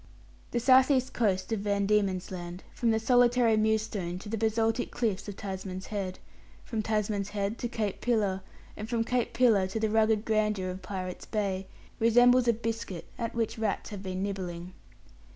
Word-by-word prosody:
The 240 - 0
south 260 +2 +6
east 260 -2 +2
coast 200 -3 0
of 220 - 0
Van 200 0 0
Diemen's 195 -3 +1
Land, 175 0 -6
from 235 - 0
the 220 - +3
solitary 240 0 +4
Mewstone 215 -5 0
to 205 - -8
the 225 - -1
basaltic 225 +1 +1
cliffs 205 -5 -2
of 205 - -5
Tasman's 190 -2 -5
Head, 195 -3 -4 0.5
from 225 -3 -2
Tasman's 210 -2 -1
Head 205 +1 -2
to 240 - -1
Cape 220 -5 -3
Pillar, 205 -6 +1 0.3
and 215 +1 -6
from 235 -2 +1
Cape 245 0 0
Pillar 220 -7 +4
to 190 +4 -3
the 220 -1 0
rugged 220 -1 +3
grandeur 210 -4 +1
of 185 +1 -7
Pirates' 185 -2 -6
Bay, 195 -3 -2 0.3
resembles 245 +2 +5
a 235 - +5
biscuit 225 -5 -4
at 230 -1 -3
which 225 -1 -1
rats 220 0 -2
have 205 -2 -6
been 185 -1 -3
nibbling. 185 -3 -4
215 Hz, 175 wpm, -29 LUFS, 195-230 Hz, 0.5 s, south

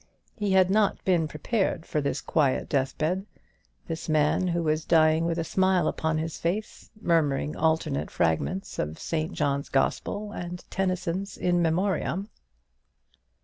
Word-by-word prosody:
He 205 -4 0
had 190 -1 +5
not 210 0 +2
been 175 -4 +3
prepared 175 +3 -1
for 150 - -1
this 140 0 -1
quiet 145 -5 +1
deathbed; 155 +8 -1 0.6
this 165 0 -5
man, 155 +4 +2
who 170 -1 0
was 155 0 +1
dying 160 0 +4
with 170 0 -1
a 165 - 0
smile 185 0 +2
upon 160 0 0
his 160 0 -3
face, 200 +6 -3
murmuring 150 -6 +1
alternate 160 - 0
fragments 85 - -1
of 75 +1 -2
St. 160 0 -2
John's 140 -1 -1
Gospel 205 +9 -1
and 175 -2 -6
Tennyson's 185 0 -2
"In 175 -1 +1
Memoriam." 180 +2 0
165 Hz, 140 wpm, -27 LUFS, 155-185 Hz, 0.6 s, had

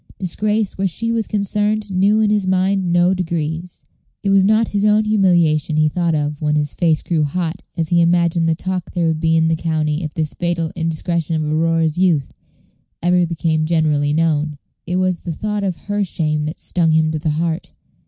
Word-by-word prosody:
Disgrace 210 +3 -1
where 195 - +2
she 230 +6 -2
was 230 -2 -1
concerned 210 +1 -1
knew 200 +4 +3
in 210 -1 +2
his 205 -3 +1
mind 190 -1 +1
no 175 +2 +3
degrees. 170 -1 -4 0.4
It 200 - +1
was 195 -1 +5
not 215 +3 +3
his 205 -1 -1
own 210 +1 +4
humiliation 175 -7 +2
he 155 0 +3
thought 170 0 0
of 150 0 -2
when 150 -1 +1
his 145 -1 -1
face 160 -3 +1
grew 165 -3 0
hot 170 +4 -3 0.2
as 165 -2 -1
he 175 -1 +3
imagined 170 -1 +2
the 160 - +2
talk 185 +1 -4
there 175 -2 0
would 160 -1 0
be 165 0 +2
in 160 0 +3
the 165 - +2
county 155 -1 -1
if 155 - -4
this 155 -2 -2
fatal 170 -2 -2
indiscretion 165 0 -2
of 155 - -1
Aurora's 165 0 +1
youth 165 -8 +1 0.7
ever 175 0 +3
became 160 -2 -1
generally 155 -3 +1
known; 155 -1 0 0.3
it 180 - -2
was 185 -1 +1
the 175 - -5
thought 210 +4 -3
of 190 -3 -1
her 205 0 -1
shame 155 -4 -1
that 155 - -5
stung 170 -3 0
him 160 0 +2
to 155 - -2
the 155 +1 -2
heart. 165 +3 -2
170 Hz, 200 wpm, -19 LUFS, 155-190 Hz, 0.7 s, was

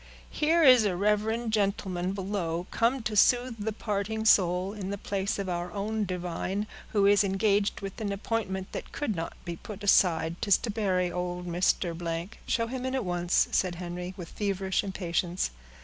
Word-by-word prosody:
"Here 325 +2 +3
is 255 -5 +8
a 200 -4 +1
reverend 215 +4 0
gentleman 195 -3 0
below, 185 -4 -2
come 235 +2 +1
to 215 -1 -2
soothe 245 +3 +4
the 220 - -1
parting 215 +1 -2
soul, 185 -1 +4
in 200 -3 -5
the 200 - -3
place 195 0 -2
of 200 -1 -3
our 175 0 -3
own 210 +2 -2
divine, 185 +2 -3 0.2
who 205 -2 +2
is 205 +1 +5
engaged 200 +1 +1
with 195 +2 -6
an 205 -2 -1
appointment 195 -2 -3
that - - -6
could 240 -8 -2
not 165 0 -4
be 170 -1 -4
put 210 +2 -9
aside; 170 -4 +3
'tis 200 -3 +5
to 225 - -4
bury 185 -4 0
old 180 0 -3
Mr.——" 170 -1 -1 0.2
"Show 230 - +1
him 250 +2 -5
in 260 - -2
at 260 -5 -1
once," 175 0 +2
said 185 -2 +1
Henry, 180 +1 -6
with 175 -3 -7
feverish 195 -2 -1
impatience. 180 - -1
195 Hz, 175 wpm, -28 LUFS, 180-215 Hz, 0.2 s, is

